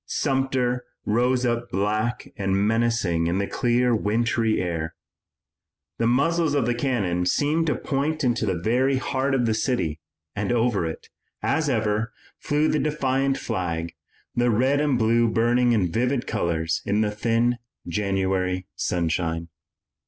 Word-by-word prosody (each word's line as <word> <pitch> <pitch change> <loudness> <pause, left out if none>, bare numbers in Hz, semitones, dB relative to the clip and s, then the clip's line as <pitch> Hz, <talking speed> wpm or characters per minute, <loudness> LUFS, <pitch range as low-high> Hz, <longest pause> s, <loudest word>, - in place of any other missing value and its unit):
Sumter 130 -3 0 0.2
rose 125 +3 +2
up 120 0 -1
black 110 +4 -1
and 95 -1 0
menacing 115 -7 +1
in 85 +2 0
the 100 - 0
clear 120 +1 +1
wintry 115 +1 +1
air. 85 -2 -3 1.0
The 115 - +2
muzzles 150 +5 +2
of 140 -5 +2
the 120 - +1
cannon 100 -9 0
seemed 155 - +1
to 150 - +1
point 150 +3 -1
into 120 -3 +1
the 95 - +1
very 125 +9 +1
heart 135 +1 0
of 125 -2 +1
the 110 - +2
city, 110 - -1 0.4
and 105 +1 -1
over 115 -7 +1
it, 80 - -7 0.3
as 160 -2 +1
ever, 110 -2 0 0.3
flew 150 0 +1
the 155 - +1
defiant 135 -2 0
flag, 85 -6 -3 0.4
the 120 0 +2
red 130 +6 +2
and 145 -4 +2
blue 115 0 +3
burning 120 +2 +2
in 95 -7 +1
vivid 125 +5 0
colors 80 -1 -1
in 105 +2 +1
the 105 -1 +1
thin 115 +3 +1 0.3
January 95 -1 -1
sunshine. 85 -1 -1
115 Hz, 145 wpm, -24 LUFS, 95-130 Hz, 1.0 s, blue